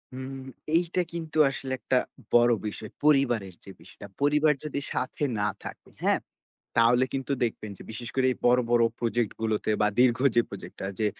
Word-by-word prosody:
উম 130 +1 -6 0.4
এইটা 175 +1 0
কিন্তু 160 -2 -5
আসলে 135 -1 -5
একটা 130 - +1 0.4
বড় 120 0 +6 0.2
বিষয়, 105 +1 -6 0.2
পরিবারের 120 -10 +3
যে 95 - -10
বিষয়টা। - - -12
পরিবার 150 +1 +4
যদি 150 -2 -3
সাথে 130 +3 -3 0.2
না 105 - +1 0.2
থাকে, - - -9
হ্যাঁ? - - +3 0.6
তাহলে 120 +2 +5
কিন্তু 135 0 -3
দেখবেন 110 -2 -3
যে - - -11
বিশেষ 120 0 -6
করে, 130 -1 +2
এই - - -5
বড়, 125 +1 +5
বড় 120 -1 +5 0.2
প্রজেক্ট 115 -1 0
গুলোতে। 110 -1 -1
বা 105 - +4
দীর্ঘ 125 -1 +5 0.2
যে 120 - +6
প্রজেক্টটা 100 -1 -8
যে, 110 - +2
125 Hz, 170 wpm, -27 LUFS, 110-135 Hz, 0.6 s, বড়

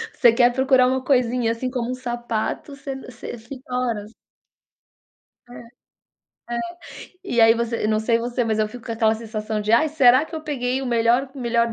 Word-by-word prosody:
Você 235 - +6
quer 240 +1 +4
procurar 260 -1 +4
uma 260 0 0
coisinha, 250 -3 +1
assim, 230 +3 -3
como 245 -1 -3
um - - -2
sapato 240 +2 -4
você 275 -1 -6
você 255 -2 -9
fica 250 +2 -11
horas. 230 -4 -2 1.4
É. - - -12
É, - - -11 1.6
e 240 -11 0
aí 225 0 +7
você 235 -1 -2
não 215 0 +1
sei 230 +1 +1
você, 240 +1 -2
mas 220 -1 -1
eu 215 -1 +1
fico 240 +2 -11
com 230 - -3
aquela 220 -1 +2
sensação 220 -1 -4
de: 210 +1 -1
"Ai, 275 +7 +4
será 270 -2 +5
que 320 - -6
peguei 265 -4 -2
o - - -4
melhor 240 +2 +2
o - - -9
melhor 235 -1 +1
240 Hz, 185 wpm, -22 LUFS, 230-255 Hz, 1.6 s, aí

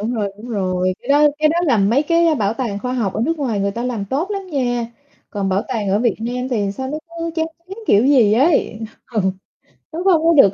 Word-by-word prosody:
Đúng 230 +4 -2
rồi, 205 -3 -2
đúng 230 +3 -10
rồi. 185 -3 0
Cái 245 - -14
đó 295 +1 +5
cái 305 0 +4
đó 330 +3 +1
là 260 -7 +3
mấy 225 +8 +3
cái 335 +1 +3
bảo 210 -5 0
tàng 230 -5 -3
khoa 250 +3 -4
học 225 -7 -1
ở - - -2
nước 330 +3 -1
ngoài 235 -8 -1
người 200 0 0
ta 230 +4 -5
làm 235 -5 -2
tốt 285 - -2
lắm 395 -2 -4
nha. 245 -4 -1 0.4
Còn 200 -2 -2
bảo 190 +2 +1
tàng 225 -6 -2
ở 195 +2 +2
Việt 235 -2 +1
Nam 250 +2 -3
thì 205 -5 0
sao 260 +6 -5
nó 305 - -3 0.2
cứ 335 0 -2
chán 320 0 +1 0.2
chán 390 +4 -8
kiểu 210 +5 +4
gì 250 -7 +5
ấy. 260 -2 +2 0.3
Ừ, 220 - +1 0.7
nó 340 +3 -4
không 345 -5 +4
có 335 - +5
được 200 -8 +7
245 Hz, 250 wpm, -19 LUFS, 205-300 Hz, 0.7 s, được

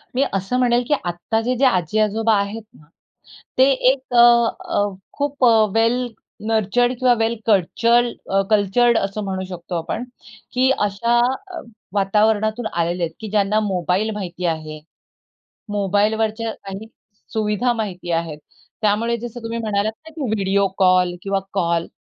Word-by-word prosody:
मी 260 - +2
असं 195 +6 -1
म्हणेल, 245 -1 +3
की - - +2
आत्ताचे 225 +8 -1
जे 270 - +3
आजी-आजोबा 215 +2 +2
आहेत 200 +3 -3
ना, 150 - -19 0.7
ते 260 - +6 0.3
एक 260 -2 -7
अ, - - +3 0.5
अ, - - +1 0.4
"खूप 285 -2 0
अ, - - +7 0.3
वेल 235 +2 +2 0.4
नर्चर्ड 225 +3 +2
किंवा 255 -1 +4
वेल 225 +1 +1
कल्चर्ड 230 +4 +3 0.4
कल्चर्ड 220 +3 +3
असं 200 +1 -2
म्हणू 190 -1 -3
शकतो 175 0 -6
आपण." 165 +8 -4 0.5
की 255 +1 +3
अ, - - +2
अशा 235 +4 +1 0.7
वातावरणातून 215 +3 +1
आलेले 170 +1 -1
आहेत, 165 - -2
की 220 - -6
ज्यांना 210 +1 +2
मोबाईल 185 +3 0
माहिती 180 -3 -5
आहे. 155 -2 -3 0.9
मोबाईलवरच्या 215 +3 0
काही 195 +2 -7 0.5
सुविधा 215 +2 0
माहिती 195 -6 -5
आहेत. 165 -2 -2 0.4
त्यामुळे 220 +3 +1
जसं 240 +1 -7
तुम्ही 230 +1 -4
म्हणालात 215 -1 -1 0.2
ना - - -12
की 315 - -6
व्हिडिओ 200 -1 +1
कॉल 185 -1 +3
किंवा 195 0 0 0.2
कॉल 170 -3 0
210 Hz, 140 wpm, -20 LUFS, 190-235 Hz, 0.9 s, अ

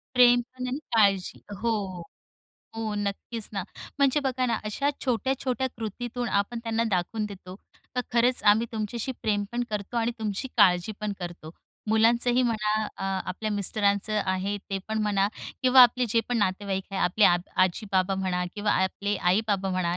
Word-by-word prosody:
प्रेम 245 -1 +6
पण 255 0 -4
आणि 260 +3 -3 0.2
काळजी 195 -4 +2 0.2
हो. 230 +1 0 1.1
हो 220 -2 -2
नक्कीच 205 +2 -4
ना. 195 -2 -2 0.4
म्हणजे 280 +1 +3
बघा 255 -2 0
ना, 235 - +1
अशा 215 +7 -1 0.2
छोट्या-छोट्या 260 +1 0
कृतीतून 240 +2 -4
आपण 200 +4 0
त्यांना 230 0 0
दाखवून 195 +4 -1
देतो, 190 -3 -10 0.4
तर - - +3
खरंच 245 +1 +3
आम्ही 225 +3 0
तुमच्याशी 225 +4 -3
प्रेम 205 -2 +1
पण 245 +1 0
करतो 210 +3 -4
आणि 230 +1 +1
तुमची 215 +4 -3
काळजी 180 +2 +4
पण 210 -1 -2
करतो. 175 -3 -7 0.4
मुलांचंही 235 +3 +3
म्हणा 215 -3 0 0.2
अ, - - -7 0.3
आपल्या 215 +3 -3
मिस्टरांचं 205 +1 +1
आहे 190 +2 -1
ते 195 - -1
पण 220 0 -1
म्हणा 200 -1 +2 0.3
किंवा 255 0 +8
आपले 245 0 +4
जे 230 +2 +3
पण 245 -1 0
नातेवाईक 195 -1 -1
आहे. 195 - -3
आपले 200 +4 +3
आब 175 0 +5 0.2
आजी, 185 +4 +2
बाबा 190 +1 +2
म्हणा 185 -2 -1
किंवा 205 0 0
आपले 200 +2 -1
आई-बाबा 195 +1 +1
म्हणा 180 -1 0
215 Hz, 160 wpm, -27 LUFS, 195-240 Hz, 1.1 s, किंवा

